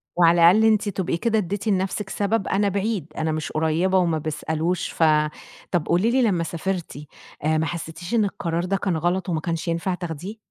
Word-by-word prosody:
وعلى 170 Hz, 0 st, +6 dB
الأقل 220 Hz, +4 st, +4 dB
أنتِ 215 Hz, -1 st, +3 dB
تبقي 185 Hz, -3 st, -2 dB
كده 225 Hz, +4 st, +1 dB
ادّيتِ 205 Hz, +1 st, -2 dB
لنَفْسِك 195 Hz, 0 st, -1 dB
سبب 200 Hz, 0 st, -1 dB
أنا 200 Hz, +1 st, +2 dB
بعيد، 200 Hz, -2 st, -1 dB
أنا 160 Hz, 0 st, 0 dB
مش 155 Hz, -1 st, -3 dB
قريّبة 160 Hz, +4 st, +1 dB
وما 170 Hz, -3 st, +2 dB
بيسألوش 160 Hz, +3 st, -2 dB
ف -, -, -1 dB, 0.7 s
طَب 175 Hz, -4 st, +1 dB
قولي 185 Hz, +7 st, +2 dB
لي 260 Hz, +1 st, +3 dB
لمّا 190 Hz, -8 st, +2 dB
سافرتِ، 170 Hz, 0 st, -4 dB, 0.5 s
آآ 155 Hz, +1 st, +2 dB
ما 160 Hz, -, +1 dB
حسّتيش 165 Hz, +3 st, -6 dB
إن 225 Hz, -3 st, +3 dB
القرار 170 Hz, -3 st, -2 dB
ده 195 Hz, +2 st, 0 dB
كان 185 Hz, -4 st, -1 dB
غلط 175 Hz, +3 st, -1 dB
وما 160 Hz, -2 st, -1 dB
كانش 165 Hz, +1 st, -3 dB
ينفع 170 Hz, +2 st, -1 dB
تاخديه؟ 175 Hz, +4 st, -6 dB
175 Hz, 190 wpm, -23 LUFS, 165-200 Hz, 0.7 s, وعلى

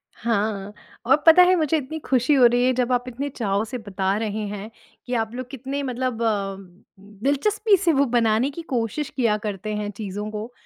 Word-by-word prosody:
हाँ, 210 Hz, -3 st, -2 dB, 0.3 s
और 260 Hz, +3 st, +6 dB
पता 325 Hz, +3 st, +9 dB
है 365 Hz, +1 st, +5 dB
मुझे 320 Hz, -2 st, +1 dB
इतनी 300 Hz, +2 st, -5 dB
खुशी 255 Hz, +2 st, +2 dB
हो 260 Hz, -3 st, +6 dB
रही 245 Hz, +1 st, +4 dB
है 255 Hz, -, +4 dB
जब 250 Hz, 0 st, 0 dB
आप 245 Hz, 0 st, +1 dB
इतने 265 Hz, +4 st, -4 dB
चाव 205 Hz, -6 st, -1 dB
से 240 Hz, +3 st, -5 dB
बता 195 Hz, -3 st, -2 dB
रहे 215 Hz, -1 st, -3 dB
हैं 205 Hz, +1 st, -6 dB, 0.4 s
कि 250 Hz, -, -4 dB
आप 225 Hz, -1 st, -1 dB
लोग 255 Hz, 0 st, -6 dB
कितने 270 Hz, +2 st, -4 dB
मतलब 255 Hz, -2 st, -3 dB
अ -, -, +1 dB
अ, 200 Hz, -3 st, -1 dB, 0.7 s
दिलचस्पी 415 Hz, +10 st, +2 dB
से 350 Hz, -3 st, +2 dB
वो 280 Hz, 0 st, +3 dB
बनाने 230 Hz, +2 st, +3 dB
की 335 Hz, -, -7 dB
कोशिश 260 Hz, -1 st, -2 dB
किया 230 Hz, -5 st, +2 dB
करते 210 Hz, -1 st, -4 dB
हैं 210 Hz, 0 st, -3 dB
चीज़ों 210 Hz, 0 st, -5 dB
को। 215 Hz, +3 st, -6 dB
240 Hz, 205 wpm, -23 LUFS, 210-275 Hz, 0.7 s, पता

